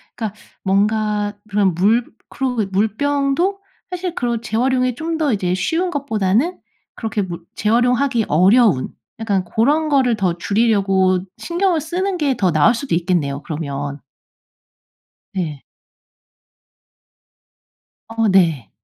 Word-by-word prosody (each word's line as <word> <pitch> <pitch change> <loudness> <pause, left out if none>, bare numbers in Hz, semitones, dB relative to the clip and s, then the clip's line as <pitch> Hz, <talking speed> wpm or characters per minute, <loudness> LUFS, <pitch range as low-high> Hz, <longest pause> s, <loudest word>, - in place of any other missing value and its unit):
그러니까 215 -3 -5 0.2
뭔가 210 +1 +1 0.2
그런 200 -3 +2
물 215 +7 +2 0.2
그리고 250 -4 -1
물병도 280 - 0 0.3
사실 360 -1 -4
그런 240 -6 -2
재활용이 250 +3 +1
좀 325 +4 -3
더 300 -5 +1
이제 185 -3 0
쉬운 335 - 0
것보다는 260 - 0 0.4
그렇게 220 -3 -2
물 175 -2 -7
재활용하기 245 +2 +2
어려운 185 - +4 0.3
약간 200 -4 0
고런 290 - +1
거를 260 -5 +3
더 185 -5 -1
줄이려고 195 -3 +2 0.2
신경을 345 -1 0
쓰는 365 +4 -2
게 285 -5 +1
더 185 -3 +2
나을 155 +9 +4
수도 270 -4 -4
있겠네요 165 -6 -1
그러면. 145 -2 -4 1.3
네. 160 -7 -4 2.4
어 225 0 0
네. 165 - +2
220 Hz, 245 characters per minute, -19 LUFS, 185-275 Hz, 2.4 s, 어려운